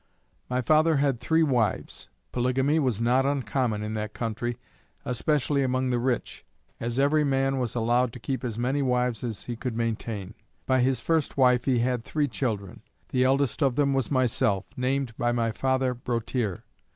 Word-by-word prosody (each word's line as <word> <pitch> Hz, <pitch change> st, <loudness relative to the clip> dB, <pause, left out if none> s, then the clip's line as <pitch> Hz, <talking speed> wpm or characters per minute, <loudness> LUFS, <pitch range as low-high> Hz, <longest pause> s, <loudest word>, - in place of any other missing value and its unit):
My 125 Hz, 0 st, 0 dB
father 155 Hz, +5 st, +4 dB
had 140 Hz, -4 st, +1 dB
three 160 Hz, +4 st, +2 dB
wives. 120 Hz, -9 st, -1 dB, 0.2 s
Polygamy 130 Hz, +5 st, +1 dB
was 125 Hz, -8 st, 0 dB
not 125 Hz, +3 st, +3 dB
uncommon 125 Hz, -5 st, 0 dB
in 105 Hz, +1 st, -4 dB
that 105 Hz, -1 st, -4 dB
country, 120 Hz, +1 st, -3 dB, 0.5 s
especially 140 Hz, +2 st, +1 dB
among 130 Hz, -1 st, 0 dB
the 120 Hz, -, +1 dB
rich, 125 Hz, -1 st, -2 dB, 0.4 s
as 120 Hz, +1 st, -3 dB
every 145 Hz, +3 st, +3 dB
man 135 Hz, -1 st, +1 dB
was 125 Hz, -2 st, -2 dB
allowed 120 Hz, +1 st, +2 dB
to -, -, -8 dB
keep 130 Hz, +3 st, -3 dB
as 115 Hz, -3 st, -3 dB
many 130 Hz, +4 st, 0 dB
wives 125 Hz, -3 st, 0 dB
as 115 Hz, -4 st, -4 dB
he 120 Hz, -, -5 dB
could 120 Hz, -1 st, -4 dB
maintain. 110 Hz, -3 st, -3 dB, 0.3 s
By 130 Hz, 0 st, +2 dB
his 130 Hz, 0 st, +2 dB
first 160 Hz, -4 st, 0 dB
wife 125 Hz, -2 st, +4 dB
he 130 Hz, -3 st, +2 dB
had 120 Hz, 0 st, 0 dB
three 150 Hz, +4 st, 0 dB
children. 110 Hz, -7 st, -3 dB, 0.3 s
The 125 Hz, -, +2 dB
eldest 135 Hz, 0 st, +1 dB
of 135 Hz, -4 st, +2 dB
them 140 Hz, -1 st, +2 dB
was 135 Hz, -4 st, 0 dB
myself, 120 Hz, -7 st, +1 dB
named 130 Hz, -2 st, -1 dB
by 120 Hz, 0 st, +2 dB
my 115 Hz, -1 st, 0 dB
father 130 Hz, +1 st, 0 dB
Broteer. 120 Hz, -4 st, -2 dB
125 Hz, 175 wpm, -26 LUFS, 115-135 Hz, 0.5 s, father